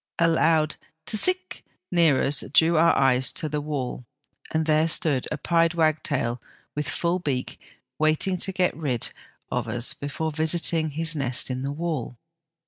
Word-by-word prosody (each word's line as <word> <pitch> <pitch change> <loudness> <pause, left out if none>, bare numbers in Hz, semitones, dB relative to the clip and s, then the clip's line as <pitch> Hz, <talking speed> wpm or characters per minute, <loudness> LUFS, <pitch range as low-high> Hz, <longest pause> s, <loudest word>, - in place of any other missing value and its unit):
A 165 - +3
loud 160 -2 +2
' 160 0 -48
tis 210 +6 +5
sic 370 0 +2
' - - -60
near 165 -6 +3
us 140 +1 +1
drew 165 +1 +4
our 165 +1 +4
eyes 130 -1 +2
to 155 - -2
the 150 0 -3
wall, 135 -5 -5 0.4
and 160 0 -1
there 155 +1 +2
stood 150 -5 0
a 150 - -2
pied 165 +2 +1
wagtail 155 -7 -1 0.3
with 150 0 -3
full 175 +1 -1
beak, 135 -7 -4 0.4
waiting 155 +4 +1
to 190 - +1
get 185 -1 0
rid 135 -8 -2 0.4
of - - -2
us 120 0 +2
before 150 +3 -4
visiting 160 +1 +2
his 160 +2 +1
nest 130 -3 0
in 130 0 -4
the 140 +1 -3
wall. 150 -6 -4
155 Hz, 170 wpm, -24 LUFS, 140-165 Hz, 0.4 s, tis